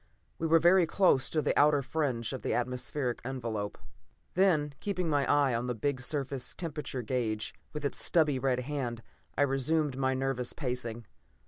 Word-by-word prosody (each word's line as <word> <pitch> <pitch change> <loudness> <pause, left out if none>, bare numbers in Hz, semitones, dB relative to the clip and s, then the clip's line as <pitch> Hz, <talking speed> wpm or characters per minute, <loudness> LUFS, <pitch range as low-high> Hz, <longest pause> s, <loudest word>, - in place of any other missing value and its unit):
We 165 - 0
were 165 +1 +6
very 175 +2 +5
close 175 -8 +3
to 155 -2 0
the - - +1
outer 145 -1 +4
fringe 130 -4 -1
of 130 - -5
the - - -1
atmospheric 125 +1 -2
envelope. 115 -5 -4 0.6
Then, 165 -6 +3
keeping 185 -4 -2
my 145 -3 +2
eye 140 -3 +3
on 120 +2 -1
the 125 - -2
big 130 +3 -1
surface 135 -1 -3
temperature 150 -7 -4
gauge, 110 -2 -2 0.2
with 150 -1 -5
its 140 - -1
stubby 150 -6 +3
red 130 -1 +1
hand, 125 -4 -4 0.3
I - - +4
resumed 140 +1 +1
my 130 0 +1
nervous 130 -2 -1
pacing. 125 -4 -4
135 Hz, 165 wpm, -30 LUFS, 125-150 Hz, 0.6 s, were